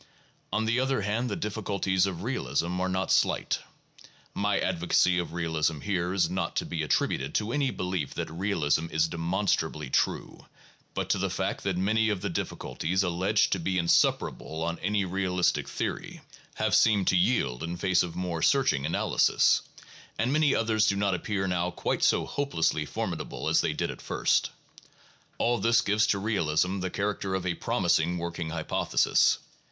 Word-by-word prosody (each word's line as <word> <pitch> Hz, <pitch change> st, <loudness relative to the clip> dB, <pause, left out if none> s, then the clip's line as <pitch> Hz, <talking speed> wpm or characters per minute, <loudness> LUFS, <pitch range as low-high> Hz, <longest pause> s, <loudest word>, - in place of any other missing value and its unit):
On 110 Hz, -, 0 dB
the 115 Hz, +2 st, +1 dB
other 135 Hz, -3 st, 0 dB
hand 115 Hz, +5 st, -1 dB
the 100 Hz, -, -2 dB
difficulties 100 Hz, -3 st, 0 dB
of 90 Hz, -2 st, -5 dB
realism 90 Hz, -, -1 dB
are 95 Hz, -, 0 dB
not 95 Hz, 0 st, -1 dB
slight. -, -, +2 dB, 0.7 s
My 100 Hz, -1 st, 0 dB
advocacy 90 Hz, +1 st, +2 dB
of 85 Hz, -, -4 dB
realism 80 Hz, -2 st, -1 dB
here 90 Hz, -3 st, -1 dB
is 90 Hz, -3 st, +2 dB
not 85 Hz, -1 st, -3 dB
to -, -, 0 dB
be 85 Hz, -2 st, -3 dB
attributed 70 Hz, -2 st, 0 dB
to 110 Hz, +1 st, 0 dB
any 140 Hz, -2 st, +1 dB
belief 90 Hz, -, -3 dB
that -, -, -4 dB
realism 80 Hz, -3 st, 0 dB
is 80 Hz, 0 st, +1 dB
demonstrably 80 Hz, -4 st, -1 dB
true, -, -, -1 dB, 0.5 s
but -, -, -2 dB
to -, -, +1 dB
the -, -, 0 dB
fact -, -, -3 dB
that 95 Hz, -2 st, -1 dB
many 110 Hz, +4 st, +2 dB
of 100 Hz, -3 st, -1 dB
the -, -, -2 dB
difficulties, 95 Hz, +4 st, -2 dB
alleged 95 Hz, +4 st, +1 dB
to 95 Hz, -, +1 dB
be 95 Hz, +2 st, -1 dB
insuperable 80 Hz, -2 st, +1 dB
on 85 Hz, 0 st, -3 dB
any 100 Hz, +1 st, 0 dB
realistic 90 Hz, -1 st, 0 dB
theory, -, -, -4 dB, 0.3 s
have -, -, 0 dB
seemed 105 Hz, -4 st, +4 dB
to -, -, +2 dB
yield 90 Hz, -, +1 dB
in 85 Hz, +2 st, -4 dB
face 90 Hz, 0 st, +2 dB
of 85 Hz, -2 st, -4 dB
more 90 Hz, -2 st, -3 dB
searching 130 Hz, -, +2 dB
analysis, 80 Hz, -, +3 dB, 0.6 s
and 125 Hz, +4 st, 0 dB
many 150 Hz, -2 st, +3 dB
others 110 Hz, -1 st, +2 dB
do 100 Hz, -, +2 dB
not 100 Hz, -1 st, +1 dB
appear 95 Hz, +2 st, -2 dB
now 90 Hz, -1 st, 0 dB
quite -, -, -2 dB
so -, -, +3 dB
hopelessly 80 Hz, -, -1 dB
formidable -, -, -4 dB
as -, -, +3 dB
they -, -, 0 dB
did -, -, -2 dB
at -, -, -11 dB
first. -, -, +1 dB, 0.9 s
All 120 Hz, +1 st, +1 dB
this 115 Hz, 0 st, +3 dB
gives 105 Hz, +1 st, +2 dB
to 100 Hz, -, +2 dB
realism 95 Hz, -3 st, 0 dB
the 95 Hz, 0 st, -2 dB
character 100 Hz, 0 st, -2 dB
of 95 Hz, -1 st, -3 dB
a 90 Hz, -, 0 dB
promising 90 Hz, +1 st, +1 dB
working 85 Hz, -1 st, -4 dB
hypothesis. 80 Hz, -1 st, +2 dB
95 Hz, 170 wpm, -28 LUFS, 85-105 Hz, 0.9 s, seemed